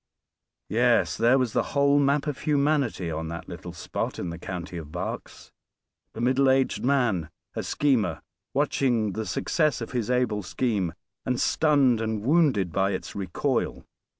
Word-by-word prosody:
Yes, 120 Hz, +2 st, +3 dB
there 120 Hz, +3 st, +4 dB
was 125 Hz, -4 st, 0 dB
the -, -, +3 dB, 0.2 s
whole 140 Hz, 0 st, +5 dB
map 140 Hz, 0 st, +2 dB
of 145 Hz, -3 st, -3 dB
humanity 140 Hz, -, +1 dB
on 80 Hz, +1 st, -3 dB
that 85 Hz, +1 st, -6 dB
little 85 Hz, 0 st, -8 dB
spot 85 Hz, -, -4 dB
in 90 Hz, -, -4 dB
the 85 Hz, -, -7 dB
county 90 Hz, -1 st, -6 dB
of 75 Hz, -3 st, -8 dB
Berks. 90 Hz, +1 st, -6 dB, 0.6 s
The 110 Hz, -, -6 dB
middle 130 Hz, +2 st, +3 dB
aged 130 Hz, 0 st, +2 dB
man, 120 Hz, -, +1 dB, 0.3 s
a -, -, -1 dB
schemer, 135 Hz, -7 st, 0 dB, 0.3 s
watching 125 Hz, -7 st, +1 dB
the 110 Hz, +2 st, -4 dB
success 155 Hz, -6 st, +1 dB
of 115 Hz, -, -6 dB
his 120 Hz, -3 st, -2 dB
able 125 Hz, -4 st, +1 dB
scheme, 95 Hz, -3 st, -1 dB, 0.3 s
and 125 Hz, -1 st, -1 dB
stunned 140 Hz, -7 st, +3 dB
and 110 Hz, -2 st, -2 dB
wounded 130 Hz, -, +3 dB
by 95 Hz, +3 st, +1 dB
its -, -, -5 dB
recoil. 95 Hz, -4 st, -2 dB
120 Hz, 155 wpm, -26 LUFS, 95-140 Hz, 0.6 s, whole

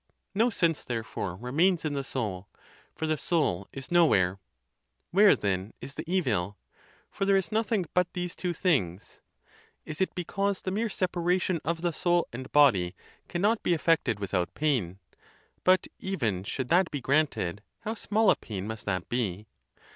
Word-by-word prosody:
No 225 Hz, +4 st, +3 dB
sense, 170 Hz, -7 st, +1 dB
therefore, 110 Hz, -6 st, -4 dB
remains 160 Hz, -, +1 dB
in 150 Hz, -, -1 dB
the 140 Hz, -1 st, -2 dB
soul; 105 Hz, -8 st, -3 dB, 0.5 s
for 160 Hz, -, -3 dB
the 155 Hz, -1 st, 0 dB
soul 100 Hz, -, 0 dB
is 135 Hz, +2 st, -8 dB
nowhere. 100 Hz, -, +4 dB, 0.7 s
Where, 200 Hz, +3 st, +7 dB
then, 95 Hz, 0 st, -2 dB
is 135 Hz, -, -7 dB
the 155 Hz, +4 st, -6 dB
evil? 105 Hz, -, 0 dB, 0.5 s
for -, -, -3 dB
there 195 Hz, 0 st, +4 dB
is 190 Hz, +2 st, -1 dB
nothing 220 Hz, -3 st, +1 dB
but 180 Hz, -1 st, +2 dB
these 180 Hz, -1 st, -3 dB
two 180 Hz, -, -2 dB
things. 130 Hz, -, -1 dB, 0.7 s
Is 155 Hz, +3 st, -5 dB
it 190 Hz, -, 0 dB
because 195 Hz, +2 st, -1 dB
the 185 Hz, -, -2 dB
mere 220 Hz, +4 st, 0 dB
separation 180 Hz, -2 st, 0 dB
of 165 Hz, +1 st, -2 dB
the 175 Hz, -1 st, +1 dB
soul 175 Hz, +1 st, +2 dB
and 130 Hz, +2 st, -7 dB
body 95 Hz, -12 st, +4 dB, 0.3 s
cannot 205 Hz, +6 st, +1 dB
be 175 Hz, -, +2 dB
effected 155 Hz, -9 st, +1 dB
without 90 Hz, -3 st, -2 dB
pain? 125 Hz, -, 0 dB, 0.7 s
But 185 Hz, 0 st, +4 dB
even 115 Hz, -, -2 dB
should 130 Hz, +4 st, -3 dB
that 175 Hz, +1 st, +4 dB
be 145 Hz, -, -3 dB
granted, 130 Hz, -, 0 dB, 0.2 s
how 220 Hz, 0 st, -3 dB
small 220 Hz, 0 st, +2 dB
a -, -, +3 dB
pain 100 Hz, -4 st, -6 dB
must 110 Hz, -1 st, -6 dB
that 95 Hz, -3 st, -1 dB
be! 105 Hz, -5 st, -2 dB
155 Hz, 160 wpm, -28 LUFS, -, 0.7 s, Where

